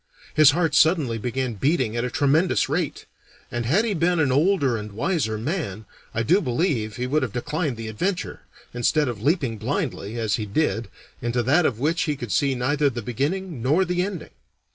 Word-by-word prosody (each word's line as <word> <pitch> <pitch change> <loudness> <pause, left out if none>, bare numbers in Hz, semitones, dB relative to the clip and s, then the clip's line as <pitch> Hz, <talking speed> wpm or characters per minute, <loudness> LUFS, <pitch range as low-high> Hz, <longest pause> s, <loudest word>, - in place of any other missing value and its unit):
His 155 -2 +7
heart 165 +2 +1
suddenly 155 -9 +3
began 125 +2 -2
beating 130 - 0
at 120 - -1
a 125 - -1
tremendous 145 +8 +2
rate, - - -2 0.5
and 120 -1 -2
had 195 - +3
he 220 - 0
been 175 0 +1
an 145 -4 +2
older 145 -3 +2
and 105 -2 -6
wiser 115 - -1
man, 110 - -3 0.3
I 115 - -1
do 180 - +3
believe 120 - -1
he 125 - -3
would 150 +4 +1
have 130 -5 -2
declined 150 +1 -2
the 115 -1 -6
adventure, 180 - -3 0.3
instead 145 +5 +1
of 115 -5 -4
leaping 135 - 0
blindly, 105 +3 -3
as 110 -2 0
he 105 -2 -4
did, 115 -1 0 0.3
into 120 0 0
that 150 +8 +4
of 115 - -2
which 160 +8 0
he 150 - 0
could 120 -6 -6
see 140 +4 +2
neither 140 +4 +1
the 120 -3 -5
beginning 145 - -2
nor 150 +10 +3
the 180 0 0
ending. 185 -4 -4
135 Hz, 190 wpm, -24 LUFS, 115-160 Hz, 0.5 s, His